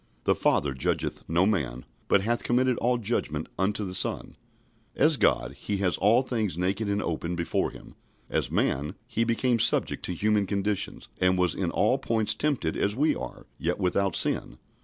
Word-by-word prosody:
"The -, -, +3 dB
Father 70 Hz, -2 st, +1 dB
judgeth 65 Hz, -, -2 dB
no 85 Hz, +3 st, +3 dB
man, 70 Hz, -, -1 dB, 0.2 s
but 100 Hz, -, +3 dB
hath 120 Hz, +2 st, 0 dB
committed 125 Hz, +1 st, +2 dB
all 125 Hz, +1 st, +2 dB
judgment 100 Hz, -9 st, -2 dB
unto 105 Hz, +2 st, 0 dB
the 90 Hz, -, -5 dB
Son." 95 Hz, -, 0 dB, 0.6 s
As -, -, +4 dB
God, -, -, +1 dB
He 100 Hz, +7 st, -3 dB
has 95 Hz, -3 st, +1 dB
all 115 Hz, +6 st, +4 dB
things 110 Hz, -, -2 dB
naked 100 Hz, +4 st, -1 dB
and 100 Hz, 0 st, 0 dB
open 85 Hz, +1 st, -3 dB
before 85 Hz, -1 st, -1 dB
Him. -, -, -13 dB, 0.3 s
As -, -, -1 dB
man, 75 Hz, +6 st, 0 dB
He 115 Hz, -1 st, -1 dB
became 115 Hz, +1 st, +1 dB
subject -, -, +2 dB
to 90 Hz, -, -3 dB
human 105 Hz, +2 st, +1 dB
conditions, 100 Hz, 0 st, -2 dB
and 90 Hz, 0 st, +3 dB
was 90 Hz, -3 st, +2 dB
in -, -, -2 dB
all -, -, +2 dB
points 110 Hz, -1 st, +1 dB
tempted 125 Hz, -, -1 dB
as 100 Hz, +1 st, 0 dB
we 150 Hz, +5 st, +2 dB
are, -, -, -7 dB
yet -, -, -1 dB
without 95 Hz, 0 st, +1 dB
sin. -, -, 0 dB
100 Hz, 180 wpm, -27 LUFS, 90-115 Hz, 0.6 s, As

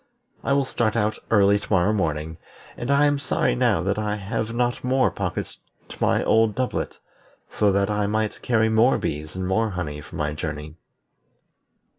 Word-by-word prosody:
I 140 Hz, -, +1 dB
will 140 Hz, -1 st, +2 dB
start 115 Hz, -4 st, -1 dB, 0.3 s
early 100 Hz, -1 st, +4 dB
to -, -, -10 dB
morrow 95 Hz, +2 st, +3 dB
morning, 80 Hz, -4 st, -2 dB, 0.4 s
and 120 Hz, -, -5 dB
I 140 Hz, +1 st, +4 dB
am 145 Hz, -1 st, +2 dB
sorry 130 Hz, -, 0 dB
now 80 Hz, +7 st, +2 dB
that 100 Hz, +3 st, 0 dB
I 105 Hz, -1 st, -1 dB
have 110 Hz, +2 st, -3 dB
not 120 Hz, +1 st, -1 dB
more 130 Hz, +1 st, +2 dB
pockets 90 Hz, -4 st, -4 dB, 0.3 s
to -, -, -10 dB
my -, -, +2 dB
old 110 Hz, -1 st, +3 dB
doublet, 130 Hz, -1 st, -2 dB, 0.5 s
so 105 Hz, -1 st, +2 dB
that 100 Hz, +1 st, +1 dB
I 105 Hz, -1 st, 0 dB
might 110 Hz, 0 st, -1 dB
carry 110 Hz, -2 st, +2 dB
more 110 Hz, +3 st, +4 dB
bees 75 Hz, +2 st, -4 dB
and 95 Hz, 0 st, -3 dB
more 110 Hz, +4 st, +1 dB
honey 80 Hz, -6 st, -4 dB
for -, -, -12 dB
my 75 Hz, 0 st, -1 dB
journey." 75 Hz, 0 st, -5 dB
105 Hz, 175 wpm, -24 LUFS, 90-115 Hz, 0.5 s, early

